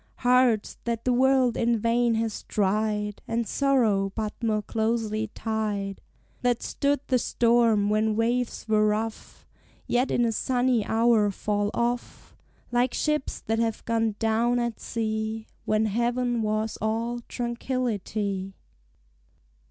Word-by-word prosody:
Hearts 245 -3 +2
that 230 -1 -2
the 250 - +3
world 260 -1 +3
in 235 0 +2
vain 230 +1 +2
has 225 -1 -2
tried, 210 0 0
And 230 0 -1
sorrow 220 -8 +2
but 215 -2 -2
more 215 -2 0
closely 220 0 -1
tied; 210 -3 -2 0.4
That 245 -1 +1
stood 285 -1 0
the 255 -2 +2
storm 230 -4 +3
when 215 +1 +1
waves 235 +2 -1
were 215 -1 +3
rough, 220 +1 -3 0.4
Yet 250 +2 +1
in 240 - +2
a 230 - +1
sunny 245 0 +1
hour 225 -2 +3
fall 205 +1 -1
off, 240 +1 -3 0.4
Like 245 +1 +1
ships 300 -2 -1
that 225 +1 -1
have 225 -1 -1
gone 225 -2 0
down 230 +2 +1
at 235 -2 -2
sea, 220 -1 -3 0.2
When 215 +1 +2
heaven 240 +2 0
was 215 0 -1
all 230 +3 -1
tranquillity! 220 -6 -3
225 Hz, 130 wpm, -26 LUFS, 215-240 Hz, 0.4 s, the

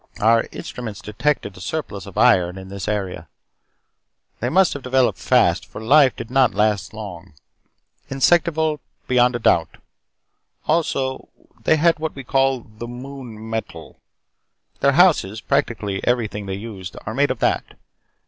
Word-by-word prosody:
Our 115 +1 +3
instruments 110 -5 -7
detected 105 -2 -2
a 90 - -12
surplus 105 - -4
of - - -11
iron 90 0 +4
in 95 0 -9
this 100 0 -6
area. 95 -6 -3 1.1
They 120 - -1
must 185 +5 +4
have 140 - -6
developed 130 0 +1
fast - - +3
for - - -9
life 130 +4 +5
did 115 - -8
not 130 -4 +3
last 105 -1 +1
long. 95 -6 -9 0.7
Insectival, 160 +2 +2 0.3
beyond 125 -1 +3
a - - -1
doubt. 85 -7 +2 0.9
Also, 135 -5 -1 0.4
they 160 - +5
had 165 0 +3
what 160 0 -3
we 135 - -7
call 135 0 +1
The 110 +1 -10
Moon 120 -3 -9
Metal. 110 0 -6 0.8
Their 140 - +3
houses, 145 - +4
practically 100 -2 -1
everything 105 -4 -1
they 95 - -3
used, 100 -3 -8
are 110 - -4
made 145 +4 +2
of - - -1
that. - - -1
120 Hz, 145 wpm, -21 LUFS, 105-135 Hz, 1.1 s, life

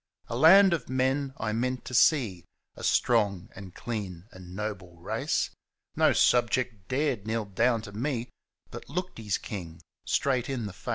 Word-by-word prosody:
A - - -3
land 180 +7 +7
of 145 -9 -3
men 130 +2 0
I 110 -1 -2
meant 125 +3 -2
to - - -7
see, 115 - +3 0.3
A - - -11
strong 100 -3 +2
and 95 -2 -10
clean 95 -7 -5
and 90 -1 -11
noble 95 -4 -5
race 85 - -1 0.2
— - - -49
No - - +4
subject 120 -4 +2
dared 130 -6 -1
kneel 110 -1 -1
down 115 +3 +1
to 105 - -9
me, 120 +2 -3 0.4
But - - -9
looked 180 0 -4
his 105 -4 -1
king 85 -6 -7 0.2
straight 130 -3 0
in 125 -5 -2
the 100 - -6
face. 100 - -9
115 Hz, 170 wpm, -28 LUFS, 100-130 Hz, 0.4 s, land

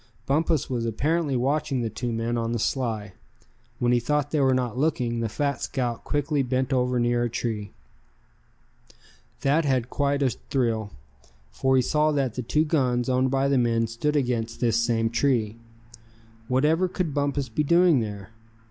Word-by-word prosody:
Bumpus 155 +2 +1
was 120 -3 -2
apparently 150 +5 0
watching 135 0 0
the 115 - -1
two 120 +3 -3
men 115 +1 -1
on 115 0 -1
the - - 0
sly. 110 -5 -2 0.6
When 120 0 +1
he 120 - +4
thought 145 +4 -1
they 155 - +1
were 135 -1 +4
not 125 -3 -1
looking, 125 -5 0
the 115 -1 -1
fat 140 +5 -2
scout 120 -4 -2
quickly 145 0 0
bent 130 +1 -1
over 125 -1 +1
near 120 0 +1
a 120 - 0
tree. 110 -2 -3 1.7
Thad 145 +4 +2
had 130 -4 0
quite 140 0 0
a 130 - +2
thrill, 115 -6 -2 0.6
for 130 0 +1
he 130 - +4
saw 155 +3 +2
that 135 -5 0
the 125 - -3
two 150 +6 +1
guns 130 -6 +1
owned 130 +1 +2
by 135 +1 +1
the 140 -2 +2
men 115 -1 +2
stood 115 +7 -2
against 120 -4 -1
this 115 -1 +2
same 115 -1 +1
tree. 115 -4 +1 0.9
Whatever 150 +8 +2
could 180 -4 -3
Bumpus 140 -1 -1
be 115 +6 -2
doing 170 -1 +4
there? 105 -2 -5
125 Hz, 170 wpm, -25 LUFS, 115-145 Hz, 1.7 s, he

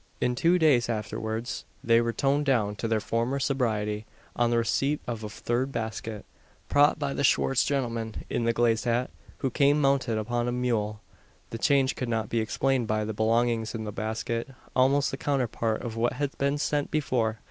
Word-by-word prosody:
In 125 - +1
two 170 +8 +3
days 140 -8 +3
afterwards 110 +1 -3 0.2
they 115 0 +4
were 115 0 0
toned 140 +4 +1
down 110 -6 +2
to 115 - -2
their 110 -1 +1
former 115 +5 -1
sobriety 110 -6 -1 0.3
on 120 -1 +2
the 120 - +2
receipt 135 +6 +1
of 115 -2 -4
a 105 - -4
third 120 +5 -2
basket, 110 -2 -4 0.4
"prot 145 +2 +4
by 140 -2 -2
the 140 - -2
Schwartz 135 -1 +3
gentleman" 115 -5 -2
in - - -1
the 115 - +3
glazed 115 0 +1
hat, 120 +2 0 0.3
who 130 - +1
came 145 +2 +3
mounted 135 -5 +2
upon 120 +2 -1
a - - 0
mule. 115 -4 -1 0.5
The 115 - -5
change 135 0 +3
could 125 - -3
not 110 -3 -1
be 115 - 0
explained 125 +2 0
by 110 0 0
the 110 - -3
belongings 115 +1 +1
in 110 - -4
the 105 - -4
basket 110 +2 -3 0.3
almost 135 +2 +3
the 135 - -4
counterpart 120 -6 -1
of 115 -2 -5
what 120 +1 +1
had 145 -1 -3
been 140 +1 +1
sent 145 0 0
before. 120 -7 0
120 Hz, 190 wpm, -27 LUFS, 110-135 Hz, 0.5 s, they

